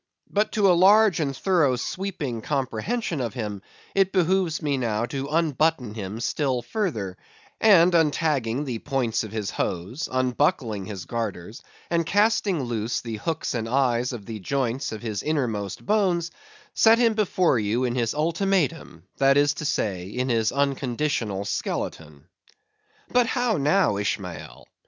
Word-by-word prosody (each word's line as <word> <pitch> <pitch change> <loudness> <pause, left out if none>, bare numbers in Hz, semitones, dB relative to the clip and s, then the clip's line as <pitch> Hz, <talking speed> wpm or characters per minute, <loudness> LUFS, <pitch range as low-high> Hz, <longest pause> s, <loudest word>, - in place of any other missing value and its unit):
But 210 +1 +1
to 210 -3 +2
a - - +6
large 195 +2 +5
and 140 -4 -2
thorough 165 -9 +2
sweeping 140 - -4
comprehension 145 - -2
of 115 -4 -3
him, 105 -4 -4 0.3
it 195 -1 +2
behooves 185 -2 +1
me 145 -3 0
now 115 -3 -1
to 135 +3 -4
unbutton 155 -5 +1
him 105 0 -6
still 125 +1 -1
further, 115 - -3 0.4
and 180 -5 +6
untagging 150 -5 +1
the 120 -4 -3
points 130 -6 -1
of 110 - -8
his 105 -2 -3
hose, 100 - -3
unbuckling 130 - 0
his 100 -5 -6
garters, 110 -3 -5 0.3
and 170 0 +2
casting 205 -3 +2
loose 120 -1 -2
the 115 -2 -5
hooks 160 +8 -3
and 115 -2 -2
the - - -7
eyes 125 -2 +2
of 115 -5 -7
the 110 0 -6
joints 130 +4 -2
of 110 +1 -7
his 105 -4 -3
innermost 115 -11 -2
bones, 180 -5 +1 0.4
set 225 0 +5
him 230 -2 +3
before 185 - +2
you 110 +4 0
in 125 -2 0
his 120 -1 -1
ultimatum; 170 +1 -1
that 135 0 +4
is 145 0 +4
to 150 - -6
say, 95 -9 -1
in 125 +6 -2
his 115 -2 +2
unconditional 130 -6 -1
skeleton. 75 -7 -4 0.8
But 245 -1 +3
how 245 -4 +1
now, 150 - +2
Ishmael? 100 -3 -4
135 Hz, 150 wpm, -25 LUFS, 110-170 Hz, 0.8 s, a